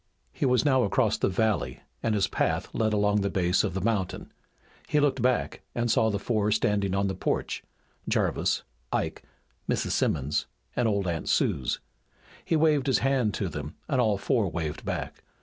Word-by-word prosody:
He 140 - 0
was 125 +3 +3
now 130 -3 +4
across 115 -3 +2
the - - +2
valley 95 - 0 0.2
and 110 -1 +1
his 100 - +2
path - - 0
led 110 -1 +1
along 105 0 +2
the 100 - 0
base 90 -1 +2
of 95 -4 -2
the 95 - -1
mountain. 105 -3 -1 0.6
He 150 - +3
looked 145 -3 +2
back 125 0 +1
and 120 -1 +1
saw 110 - +3
the 100 - 0
four 105 0 0
standing 100 -2 +1
on 100 0 +1
the 95 - -1
porch, - - -2 0.5
Jarvis, - - +1 0.3
Ike, - - -1 0.5
Mrs. - - 0
Simmons, 70 0 0 0.3
and 120 - +2
old 100 -3 0
Aunt 85 -2 -2
Suse. 65 -3 +1 0.6
He 165 - 0
waved 150 -3 +3
his 135 - +4
hand 130 -6 +2
to 100 - -1
them 75 -1 -6
and 135 -4 +2
all 110 -4 +2
four 110 -2 +1
waved 80 -3 -4
back. - - -4
105 Hz, 180 wpm, -27 LUFS, 95-125 Hz, 0.6 s, now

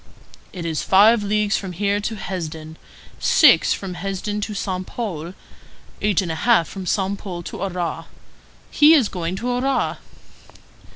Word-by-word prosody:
"It 175 -2 -7
is 160 -2 -2
five 210 +4 +5
leagues 210 0 +1
from 190 -2 -6
here 200 +3 0
to 215 +2 -3
Hesdin, 160 -5 -6 0.4
six - - +5
from 190 -2 -3
Hesdin 195 +3 -4
to 210 0 -4
Saint 185 -2 -3
Pol, 180 -7 -5 0.7
eight 205 -2 +2
and 170 - -4
a 160 - -5
half 230 -9 +3
from 190 -2 -8
Saint 195 +1 -1
Pol 175 -4 -7
to - - -8
Arras. 180 -3 -3 0.7
He 300 +2 +6
is 255 -9 +3
going 175 -1 -4
to 245 +6 -3
Arras." 260 +2 0
195 Hz, 155 wpm, -21 LUFS, 175-210 Hz, 0.7 s, He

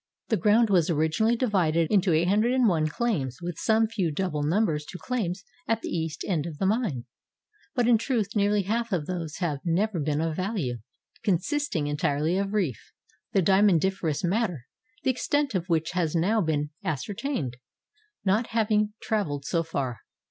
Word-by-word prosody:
The 225 - +3
ground 210 +4 +4
was 175 -4 +3
originally 160 +9 +2
divided 175 -9 +2
into 195 -3 +3
801 195 +1 +3
claims 150 - -1
with 175 -2 -5
some 220 0 +3
few 210 -6 -1
double 155 -1 -2
numbers 155 -1 +1
to 180 - -8
claims 195 -3 -3 0.2
at 225 0 +1
the - - -3
east 160 -2 -3
end 170 -5 0
of 155 -3 -7
the 190 - -1
mine; 190 - 0 0.3
— 420 -3 -37
but 245 -3 +2
in 235 -2 +5
truth 225 -5 -1
nearly 205 0 +2
half 230 +4 -1
of 170 -6 0
those 170 -3 -4
have 165 -6 -1
never 180 +3 0
been 150 0 0
of 160 -1 -1
value, 185 - -2 0.4
consisting 205 - 0
entirely 145 +2 0
of 200 0 -1
reef, 180 - -2 0.4
the 195 - +3
dia 190 +2 +4
mondiferous 190 -5 +2
matter, 180 - 0 0.4
the 260 - +3
extent 285 +1 0
of 185 -1 -2
which 165 -1 +1
has 175 -3 -1
now 205 +7 +2
been 150 -3 -1
ascertained, 155 - -3 0.7
not 210 +5 +2
having 215 -2 +1
traveled 150 -11 -1
so 170 - +1
far. 140 -7 -3
185 Hz, 165 wpm, -27 LUFS, 160-220 Hz, 0.7 s, in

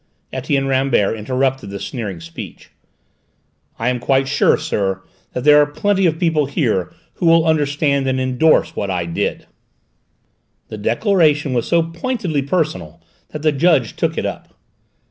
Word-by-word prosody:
Etienne 135 +1 -1
Rambert 130 -6 +1
interrupted 130 +2 -1
the 100 0 -6
sneering 105 -8 -5
speech. 85 0 -10 1.1
"I 115 +2 0
am 125 -1 -1
quite 135 +2 +1
sure, 140 - +3
sir, 95 - -2 0.3
that 125 - -3
there 150 +1 +7
are 145 - +2
plenty 195 +5 +1
of 160 -1 0
people 160 -4 +1
here 115 - -1 0.3
who 175 - 0
will 165 -1 +5
understand 145 -3 +1
and 130 0 0
endorse 155 +5 +2
what 100 - -3
I 90 -2 -1
did." 85 - -3 1.2
The 110 - -7
declaration 150 - +2
was 120 -2 -1
so 170 -1 +3
pointedly 170 - -2
personal 135 - -2 0.3
that 150 0 -7
the 155 - +4
judge 145 -4 +2
took - - -1
it - - -1
up. - - -6
135 Hz, 150 wpm, -18 LUFS, 120-160 Hz, 1.2 s, there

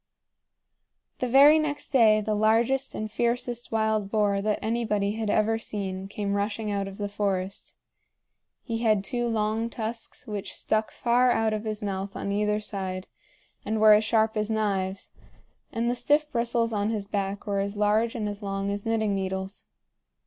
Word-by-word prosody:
The 250 - 0
very 285 +5 +7
next 295 -2 -2
day 220 -6 +5
the 215 +1 -1
largest 230 +5 +2
and 215 0 -4
fiercest 240 +1 -1
wild 220 -2 0
boar 205 -2 +1
that 210 +1 0
anybody 215 -3 0
had 220 0 -3
ever 220 +2 +2
seen 195 -3 -4
came 200 0 -3
rushing 205 +1 -2
out 200 -1 -1
of 195 0 -9
the 205 - -2
forest. 200 -2 -3 0.9
He 230 -2 -3
had 215 -4 +2
two 240 +3 -1
long 220 0 0
tusks 230 0 -5
which 205 -2 -5
stuck 215 0 0
far 245 +1 +2
out 225 -2 +1
of 215 +1 -3
his 215 0 -3
mouth 195 -1 -3
on 200 - -3
either 210 +1 +1
side 190 -3 -4 0.5
and 220 0 -1
were 215 0 +8
as 210 +1 +4
sharp 220 0 +2
as 215 0 -1
knives, 195 -3 -1 0.6
and 230 0 -1
the 240 - +2
stiff 295 +5 +1
bristles 235 -1 0
on 205 0 0
his 215 -3 -2
back 200 0 -3
were 200 -1 -1
as 200 +1 -3
large 215 +3 +2
and 215 -3 -2
as 205 0 -5
long 195 0 -2
as 200 +2 -4
knitting 220 -2 +1
needles. 190 0 -4
215 Hz, 170 wpm, -26 LUFS, 200-225 Hz, 0.9 s, were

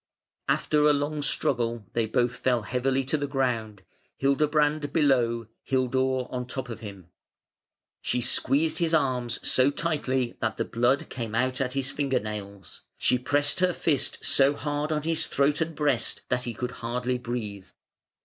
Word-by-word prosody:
After 150 0 +3
a - - +5
long 145 +1 -1
struggle 115 -5 0
they 115 -2 +1
both 120 +2 +1
fell 125 -3 +1
heavily 130 +4 0
to 135 +4 0
the 145 -1 -2
ground, 115 -7 -1 0.3
Hildebrand 145 +1 +2
below, 125 -7 +2 0.2
Hildur 130 0 +1
on 125 -1 -3
top 130 0 -5
of 115 -2 -6
him. 100 -5 -10 0.9
She 125 - 0
squeezed 140 +5 +1
his 165 -1 +2
arms 125 -5 0
so 130 +2 +4
tightly 140 -5 -1
that 110 - -1
the - - 0
blood 120 +4 +1
came 115 -3 -4
out 130 +3 +1
at 130 -1 -1
his 135 0 -1
finger 135 -3 0
nails; 100 -3 -7 0.2
she 125 - +2
pressed 145 +5 +1
her 180 -1 +3
fist 150 -6 0
so 140 +1 +5
hard 145 +1 -2
on 150 -1 0
his 165 0 -1
throat 140 +3 +1
and 160 0 -1
breast 140 -6 0
that 125 0 0
he 120 -2 -4
could 125 +2 -3
hardly 125 +2 -1
breathe. 110 -6 -5
130 Hz, 160 wpm, -27 LUFS, 120-145 Hz, 0.9 s, a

